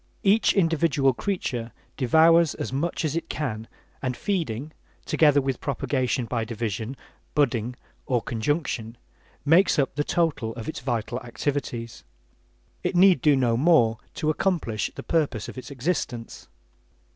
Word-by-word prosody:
Each 210 +2 +4
individual 165 -7 +2
creature 120 - -3 0.2
devours 160 +4 +4
as - - -5
much 160 +4 -1
as 155 0 -1
it 165 - -3
can 115 -7 -3 0.3
and 130 -2 -2
feeding, 155 - -2 0.3
together 150 -3 +4
with 135 -2 -2
propagation 130 -2 -1
by 115 -1 -2
division, 115 +2 -4 0.4
"budding" 125 -4 +1 0.3
or 125 -2 +2
conjunction, 115 -1 -2 0.5
makes 170 +6 +5
up 140 -2 +1
the 145 - 0
total 145 -10 0
of 115 -2 -7
its 155 - -4
vital 120 -1 -2
activities. 120 -2 -4 0.8
It - - -1
need 185 0 +6
do 150 -4 +5
no 125 -3 +2
more 120 -5 +4 0.2
to 155 - +1
accomplish 155 - -1
the - - -7
purpose 145 -10 0
of - - -8
its 130 - -8
existence. 130 -4 -3
135 Hz, 135 wpm, -25 LUFS, 120-160 Hz, 0.8 s, need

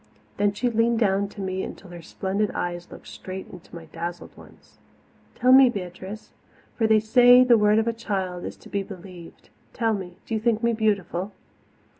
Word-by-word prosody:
Then 205 0 +2
she 245 +5 -1
leaned 230 0 +1
down 200 -3 +1
to 205 - -9
me 190 0 -3
until 190 -1 -9
her 175 -1 -9
splendid 195 +5 -2
eyes 175 0 -4
looked - - -12
straight 190 0 -8
into 180 -1 -13
my 165 -1 -9
dazzled 170 +2 -7
ones. - - -18 0.6
"Tell 255 - +3
me, 265 +1 +9
little 245 - +1 0.2
Beatrice 190 +4 -10 0.4
for 225 - +1
they 220 0 +5
say 245 +3 +6
the 250 -2 +5
word 210 -1 +3
of 225 +1 +1
a 230 - +1
child 190 -6 -4
is - - -7
to - - -16
be 200 - -1
believed 180 -3 -12 0.2
tell 225 -3 0
me, 185 -4 -6
do - - -6
you 220 - 0
think 225 0 0
me 235 0 +2
beautiful?" 205 -3 -1
205 Hz, 195 wpm, -24 LUFS, 185-225 Hz, 0.6 s, me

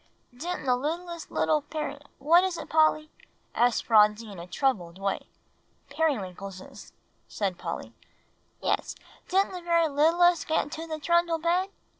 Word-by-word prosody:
"Didn't 345 +6 -4
the 250 -1 +3
littlest 335 +5 -4
little 305 -1 +1
Peri 295 -1 -5 0.2
what 340 +5 +5
is 375 -2 -1
it, - - -8
Polly?" 310 -1 +3 0.4
asked 240 0 +2
Phronsie 210 0 +4
in 195 - -9
a 170 - -8
troubled 185 -8 -1
way. 195 0 -2 0.6
"Periwinkleses," 195 - -3 0.4
said 190 -4 -3
Polly. - - -5 0.7
"Yes, - - -1 0.3
didn't 385 +2 +2
the 365 -1 -6
very 335 -1 +2
littlest 330 +3 +3
get 320 - +2
into 320 +3 -7
the 315 -1 -4
trundle 340 +2 +2
bed?" 350 +4 +1
310 Hz, 140 wpm, -27 LUFS, 225-340 Hz, 0.7 s, what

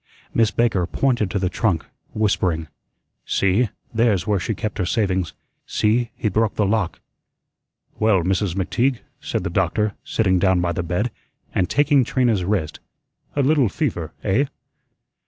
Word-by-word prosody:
Miss 115 -2 +4
Baker 105 -8 +1
pointed 120 -5 +1
to 100 - -1
the 95 -1 0
trunk, 90 -4 0 0.3
whispering: 90 -7 0 0.5
"See, 100 +4 +2 0.2
there's 110 -6 +2
where 105 -2 +1
she 105 +4 -2
kept 105 +2 -4
her 90 - +1
savings. 95 -6 0 0.3
See, 115 +3 +1
he - - -2
broke 110 +2 +1
the 105 - +2
lock." 100 -3 0 1.0
"Well, 105 -5 +3
Mrs. 95 0 0
McTeague," 120 +6 0 0.2
said - - -3
the - - -3
doctor, 100 +3 +1
sitting 95 -5 +1
down 95 -1 +3
by 90 0 0
the 85 - -2
bed, 90 +8 -1 0.4
and 90 - +1
taking 145 -2 +4
Trina's 115 -6 +1
wrist, 90 -5 -1 0.6
"a 140 - +2
little 140 -4 +3
fever, - - -2
eh?" 125 +9 +2
105 Hz, 150 wpm, -22 LUFS, 90-115 Hz, 1.0 s, Miss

